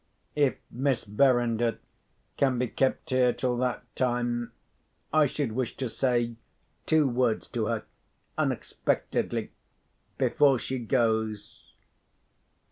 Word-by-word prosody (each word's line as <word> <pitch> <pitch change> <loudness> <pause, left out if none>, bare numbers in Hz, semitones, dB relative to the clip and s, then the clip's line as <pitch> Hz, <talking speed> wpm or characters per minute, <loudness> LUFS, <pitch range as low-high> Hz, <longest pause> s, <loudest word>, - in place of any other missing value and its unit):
If 145 -3 +2 0.2
Miss 130 0 0
Verinder 120 0 +2 0.6
can 130 -3 +2
be 125 +1 0
kept 130 +3 -1
here 125 -1 +4
till 125 -1 -1
that 125 0 -1
time, 120 -1 0 0.6
I 155 -2 +5
should 140 -3 -2
wish 120 +1 -3
to 130 - -2
say 120 -1 0 0.5
two 155 -2 +4
words 120 -3 +1
to - - -1
her—unexpectedly—before 140 -3 -2
she 130 +2 -3
goes." 110 -3 -1
125 Hz, 100 wpm, -28 LUFS, 120-130 Hz, 0.6 s, I